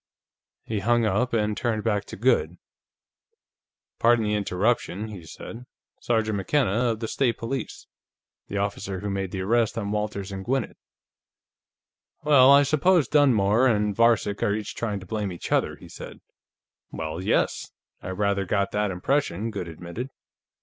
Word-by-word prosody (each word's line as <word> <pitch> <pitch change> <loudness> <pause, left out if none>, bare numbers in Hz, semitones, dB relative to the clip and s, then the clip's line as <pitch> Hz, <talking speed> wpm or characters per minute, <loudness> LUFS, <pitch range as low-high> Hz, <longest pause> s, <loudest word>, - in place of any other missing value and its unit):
He 110 -2 -3
hung 120 +3 +2
up 110 +5 +1
and 105 -2 0
turned 110 -3 -1
back 105 -3 0
to - - -9
Goode. - - +1 1.4
"Pardon 115 -1 +4
the 105 - 0
interruption," 105 +1 0
he 100 -5 -9
said. 120 +9 -10 0.3
"Sergeant 110 -3 0
McKenna, 125 +3 +1
of 115 -2 -1
the 110 - -2
State 120 -1 0
Police. 130 +4 -5 0.6
The 100 - -4
officer 100 -1 -3
who 100 -1 -3
made 95 -1 -2
the 95 +1 -4
arrest 115 +3 +1
on 100 -2 -2
Walters 105 -2 -3
and 95 0 -5
Gwinnett. 130 +1 -1 1.5
Well, 140 -3 +6
I 140 +1 +7
suppose 155 +2 +3
Dunmore 120 -5 +4
and 105 -3 +1
Varcek 115 -3 +2
are 100 - +2
each 105 -1 -5
trying 105 -4 -3
to - - -10
blame 105 +1 -2
the 90 -2 -8
other," - - +1
he - - -14
said. - - -10 0.7
"Well, 80 +2 -4
yes; - - 0 0.3
I - - -6
rather 100 +1 0
got 100 +1 0
that 105 0 0
impression," 110 +2 -1
Goode 100 -4 -5
admitted. 85 +10 -7
105 Hz, 155 wpm, -25 LUFS, 100-120 Hz, 1.5 s, I